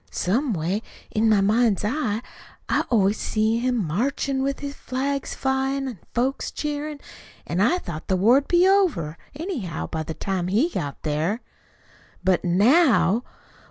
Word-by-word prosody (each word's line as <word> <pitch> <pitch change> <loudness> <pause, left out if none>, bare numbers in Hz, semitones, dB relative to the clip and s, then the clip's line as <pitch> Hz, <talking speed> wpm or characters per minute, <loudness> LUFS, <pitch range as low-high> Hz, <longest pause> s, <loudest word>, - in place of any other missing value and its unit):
Some 240 +9 0
way, 180 +5 -1 0.3
in 220 +1 +2
my 210 -2 +4
mind's 215 0 +2
eyes 230 -2 -1 0.4
I - - +1
always 210 -3 +2
see 220 +1 +1
him 245 -4 0
marchin' 265 - -1
with 275 +1 -1
flags 275 +1 -3
flyin' 270 +1 0
an' 240 -8 -6 0.2
folks 260 +3 0
cheerin'; 295 0 -4 0.5
an' 170 - -2
I 275 - +4
thought 170 - -7
the 190 - +1
war'd 245 +9 +4
be 355 +1 +4
over, 335 - +2 0.2
anyhow, 280 - -4
by 160 - -4
the 155 +1 -5
time 185 -3 -2
he 225 - +2
got 145 - -4
there. 160 +9 -1 0.8
"But, 185 -1 +2
now 225 - +4
230 Hz, 145 wpm, -24 LUFS, 190-275 Hz, 0.8 s, my